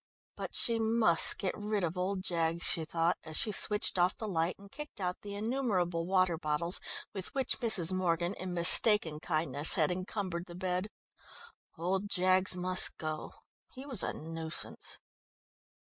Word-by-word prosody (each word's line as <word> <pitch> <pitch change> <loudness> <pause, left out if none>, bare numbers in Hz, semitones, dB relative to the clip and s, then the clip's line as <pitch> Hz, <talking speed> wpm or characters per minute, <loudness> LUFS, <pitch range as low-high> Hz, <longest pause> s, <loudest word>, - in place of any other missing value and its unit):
But - - -7
she 230 -1 +3
must 220 -6 +5
get 185 - -3
rid 210 -1 -4
of 170 +1 -3
old 185 +1 -4
Jaggs, 170 -2 -2
she 160 - +1
thought, 165 +2 -1
as 160 -1 -4
she 215 - +1
switched 210 -2 +4
off 180 +1 +1
the 220 - -6
light 170 -2 -2
and 200 0 -17
kicked 300 -5 -10
out 180 -1 -4
the 205 -1 -8
innumerable 200 -7 -2
water 185 -3 0
bottles, 165 +3 -2 0.3
with 190 -2 -4
which 270 -1 -2
Mrs. 190 -7 +3
Morgan, 175 -1 -1
in 185 -2 -7
mistaken 170 -1 +3
kindness, 155 -3 +2
had 155 +1 +1
encumbered 185 -1 -5
the 175 - -11
bed... 185 +1 -3 0.9
old 190 +4 -3
Jaggs 185 0 +3
must 185 +1 +5
go... 155 -1 -6 0.4
he 260 +2 -10
was 260 -8 -1
a - - -2
nuisance.... 160 0 -3
180 Hz, 160 wpm, -30 LUFS, 165-200 Hz, 0.9 s, must